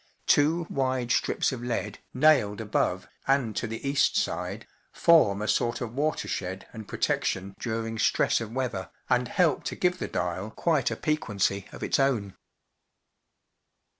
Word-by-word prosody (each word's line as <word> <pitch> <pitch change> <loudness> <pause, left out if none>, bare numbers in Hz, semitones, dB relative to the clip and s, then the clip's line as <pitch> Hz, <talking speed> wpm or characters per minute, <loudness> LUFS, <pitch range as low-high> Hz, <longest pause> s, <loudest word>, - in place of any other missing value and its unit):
Two 160 +4 +3
wide 130 -3 -1
strips 110 - +1
of 130 -3 -5
lead, 115 -4 -3
nailed 130 -7 +3
above 95 -4 -1 0.2
and 135 -6 +2
to 115 - -1
the 115 +5 -5
east 140 0 +2
side, - - -2 0.3
form 105 -12 +4
a - - -2
sort 120 +1 +1
of 120 -2 -5
water 150 +4 -1
shed 95 0 -4
and 110 -3 -8
protection 95 +1 -1
during 115 -1 -3
stress - - +2
of 110 -1 -5
weather, 120 -7 -3 0.2
and 125 0 +3
help 160 0 +2
to - - -3
give 180 0 +1
the - - -3
dial 90 +4 -2
quite 150 +3 +1
a 115 - -3
piquancy 100 -9 -1
of - - -8
its - - +1
own. 120 -8 +1
115 Hz, 155 wpm, -27 LUFS, 105-140 Hz, 0.3 s, form